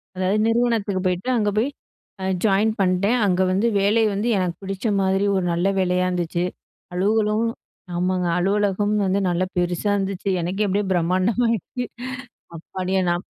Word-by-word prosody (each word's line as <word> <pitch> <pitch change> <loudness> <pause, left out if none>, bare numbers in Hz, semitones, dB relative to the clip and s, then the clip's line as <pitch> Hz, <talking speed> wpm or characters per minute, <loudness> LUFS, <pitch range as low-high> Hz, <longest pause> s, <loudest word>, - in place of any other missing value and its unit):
அதாவது, 190 +3 +1
நிறுவனத்துக்கு 225 -5 +1
போயிட்டேன். 190 +8 0
அங்க 210 -2 +1
போய் 250 - +1 0.8
ஜாயின் 210 +2 +3
பண்ட்டேன். 195 +6 +2
அங்க 185 -2 +2
வந்து 200 +5 +2
வேலை 210 +3 +3
வந்து 205 +4 -1
எனக்கு 180 -2 -1
பிடிச்ச 195 +3 -3
மாதிரி 195 +1 +1
ஒரு 185 -2 0
நல்ல 175 +3 +1
வேலையா 180 0 +1
இருந்துச்சு. 175 -1 -1 0.5
அலுவலும் 210 +4 +1 0.5
ஆமாங்க, 180 0 0
அலுவலகம் 205 +2 +1
வந்து 190 +1 +1
நல்லா 175 +1 +1
பெருசா 175 +3 0
இருந்துச்சு, 195 0 -2
எனக்கே 190 +5 -1
அப்படியே 200 +1 0
பிரம்மாண்டமாயிடுச்சு 215 +7 0 0.7
அப்பாடியே 185 +3 -2
நா 175 - +2
195 Hz, 135 wpm, -22 LUFS, 180-210 Hz, 0.8 s, ஜாயின்